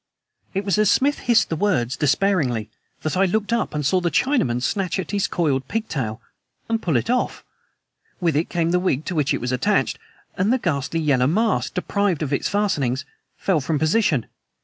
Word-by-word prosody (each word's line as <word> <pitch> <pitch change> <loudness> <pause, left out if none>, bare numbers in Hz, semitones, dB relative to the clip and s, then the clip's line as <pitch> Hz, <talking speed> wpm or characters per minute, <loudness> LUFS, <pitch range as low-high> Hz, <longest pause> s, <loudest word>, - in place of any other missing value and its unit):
It 195 +1 -1
was 200 +1 +1
as 215 -2 +4
Smith 285 +2 +2
hissed 235 -2 +3
the 165 - -1
words 155 - 0
despairingly 140 - +1 0.3
that 155 - -1
I 190 +1 +4
looked 210 +4 0
up 235 -8 -1
and 150 -1 -1
saw 180 +6 +2
the 175 - +1
Chinaman 150 - +1
snatch 195 0 -1
at 185 -4 -4
his 200 -2 +1
coiled 140 -6 0
pigtail 140 - -3 0.5
and 225 0 0
pull 160 -7 +1
it 120 - -2
off! 250 +1 -1 0.8
With 170 -4 +1
it 155 +3 0
came 170 -1 0
the 180 - +3
wig 160 -6 0
to - - -3
which 150 -5 +1
it - - +1
was 125 +1 -2
attached; 125 - +1 0.4
and 195 +4 +1
the 260 - +3
ghastly 165 - -1
yellow 135 -5 +2
mask, 215 +8 +1
deprived 200 -6 0
of 145 -1 -2
its - - 0
fastenings, 145 -11 0 0.3
fell 180 -6 +1
from 150 +3 -1
position! 155 - +2
170 Hz, 195 wpm, -22 LUFS, 140-205 Hz, 0.8 s, as